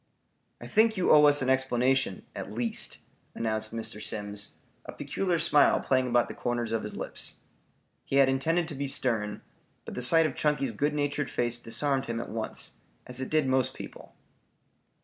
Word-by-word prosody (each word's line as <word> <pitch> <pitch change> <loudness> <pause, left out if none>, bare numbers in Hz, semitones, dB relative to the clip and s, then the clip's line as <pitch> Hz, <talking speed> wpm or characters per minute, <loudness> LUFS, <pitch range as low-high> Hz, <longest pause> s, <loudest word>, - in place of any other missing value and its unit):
"I - - -9
think 220 0 +3
you 185 - +2
owe 150 -1 +8
us 145 -1 +5
an 130 - 0
explanation, 130 -4 +1
at - - -6
least," 115 +1 -3 0.4
announced 110 -1 -1
Mr. 110 -2 -4
Simms, 105 -2 -2 0.3
a - - -8
peculiar 185 -3 -1
smile 145 -2 +4
playing 130 -1 +1
about 120 -1 +2
the - - -7
corners 120 -2 -2
of 115 -1 0
his 105 - -6
lips. - - -6 0.7
He - - -3
had 140 -1 +6
intended 160 +6 +1
to - - -6
be 140 0 -3
stern, 110 -6 -1 0.4
but - - -7
the - - -4
sight 160 +6 +6
of 155 - -1
Chunky's 150 -4 0
good 145 +7 -1
natured 145 -1 -1
face 120 0 -1
disarmed 135 +3 0
him 115 0 -2
at - - -5
once, 110 0 -4 0.3
as 125 +1 -5
it 130 - -4
did 155 -2 +2
most 130 0 +1
people. - - -10
130 Hz, 180 wpm, -28 LUFS, 115-145 Hz, 0.7 s, owe